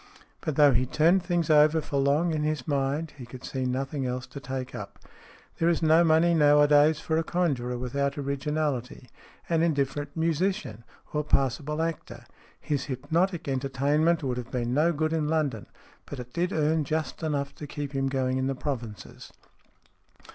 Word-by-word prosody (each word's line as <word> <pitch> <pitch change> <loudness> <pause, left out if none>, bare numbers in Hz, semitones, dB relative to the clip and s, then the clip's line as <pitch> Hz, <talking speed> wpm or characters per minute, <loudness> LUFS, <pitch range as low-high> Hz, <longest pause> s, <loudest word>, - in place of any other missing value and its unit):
But 155 - -2
though 145 -1 +6
he 125 +2 +1
turned 170 +8 +3
things 175 -3 0
over 155 +1 +5
for 145 -2 -4
long 145 +5 +2
in 155 - -1
his 150 -3 -2
mind, 145 +2 -1
he 125 - -7
could 125 +1 -11
see 130 -1 -3
nothing 135 +2 -2
else 125 +1 -3
to 140 - -9
take 130 -1 -5
up. - - -8 0.6
There 165 - +3
is 170 -1 0
no 160 +2 +5
money 165 +1 +4
nowadays 150 0 +5
for 160 - -1
a - - 0
conjurer 140 -9 -1
without 140 +3 -2
originality, 140 -3 -3 0.4
an 165 -1 +1
indifferent 145 -2 -1
musician, 165 - -1 0.3
or 150 0 0
passable 145 +2 0
actor. 120 -7 -5 0.3
His 145 -3 -2
hypnotic 165 +6 -1
entertainment 140 +5 +1
would 125 -2 -2
have 125 -1 -6
been 120 -2 -2
no 155 +5 +3
good 155 0 -1
in 155 -2 0
London, 150 -9 -1 0.4
but 140 - -7
it 125 0 -9
did 175 +1 -1
earn 155 0 +1
just 155 +4 -3
enough 145 -3 -2
to 150 - -9
keep 145 0 -5
him 135 -1 -1
going 130 -1 0
in 130 - 0
the 135 - -1
provinces. 120 -6 -6
145 Hz, 170 wpm, -27 LUFS, 130-160 Hz, 0.6 s, though